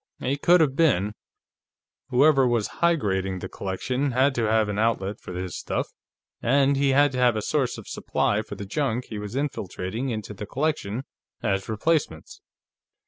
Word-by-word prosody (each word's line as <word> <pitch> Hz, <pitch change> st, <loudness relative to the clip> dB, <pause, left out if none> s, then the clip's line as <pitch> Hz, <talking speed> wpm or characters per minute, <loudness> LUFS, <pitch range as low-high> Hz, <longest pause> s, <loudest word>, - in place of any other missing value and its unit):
"He 135 Hz, +2 st, 0 dB
could 170 Hz, +4 st, +4 dB
have 140 Hz, -4 st, +2 dB
been. 110 Hz, -, +2 dB, 1.0 s
Whoever 135 Hz, +1 st, +5 dB
was 120 Hz, -3 st, +1 dB
higrading 95 Hz, -, +1 dB
the 95 Hz, -, -5 dB
collection 125 Hz, +10 st, -2 dB
had 130 Hz, +2 st, +3 dB
to 120 Hz, -3 st, 0 dB
have 110 Hz, -1 st, +3 dB
an 105 Hz, 0 st, -2 dB
outlet 105 Hz, -3 st, 0 dB
for -, -, -9 dB
his 90 Hz, -1 st, -4 dB
stuff, -, -, -3 dB, 0.5 s
and 140 Hz, +3 st, +3 dB
he 140 Hz, 0 st, +2 dB
had 140 Hz, +1 st, +4 dB
to 130 Hz, -, -3 dB
have 125 Hz, -2 st, +4 dB
a 110 Hz, -, -1 dB
source 140 Hz, -5 st, 0 dB
of -, -, -10 dB
supply 105 Hz, +1 st, 0 dB
for 110 Hz, -, -8 dB
the 100 Hz, -, -7 dB
junk 125 Hz, +2 st, -1 dB
he 110 Hz, -, -5 dB
was 105 Hz, +3 st, -6 dB
infiltrating 120 Hz, -3 st, -3 dB
into 110 Hz, -3 st, -4 dB
the 105 Hz, +1 st, -7 dB
collection 135 Hz, -4 st, -2 dB, 0.4 s
as 95 Hz, +1 st, -1 dB
replacements. 165 Hz, -, -1 dB
120 Hz, 170 wpm, -25 LUFS, 105-140 Hz, 1.0 s, Whoever